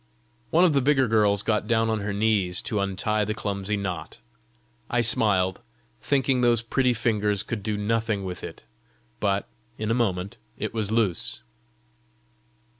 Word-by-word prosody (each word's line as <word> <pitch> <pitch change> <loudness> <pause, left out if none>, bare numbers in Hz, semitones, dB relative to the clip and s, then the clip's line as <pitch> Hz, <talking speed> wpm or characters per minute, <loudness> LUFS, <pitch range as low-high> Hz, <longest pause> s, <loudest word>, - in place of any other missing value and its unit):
One 170 +7 +5
of 170 - +3
the 140 - +3
bigger 135 -1 +3
girls 105 -2 +3
got 110 -1 0
down 115 -1 +2
on 110 - 0
her 100 0 -3
knees 100 -3 +1
to 105 - -1
untie 100 +2 0
the 105 +1 -2
clumsy 105 -1 -2
knot. 90 -5 -5 0.7
I 120 - +2
smiled, 100 -4 +2 0.4
thinking 135 -2 +1
those 120 -2 +3
pretty 125 +1 +1
fingers 105 -3 0
could 115 -3 -4
do 105 +1 -2
nothing 110 -1 -1
with 90 -2 -6
it, - - -8 0.6
but 100 -1 0 0.3
in 110 +1 -2
a - - +3
moment 100 -5 -1 0.2
it - - -4
was 110 -3 -2
loose. 110 -6 -1
105 Hz, 155 wpm, -25 LUFS, 100-115 Hz, 0.7 s, One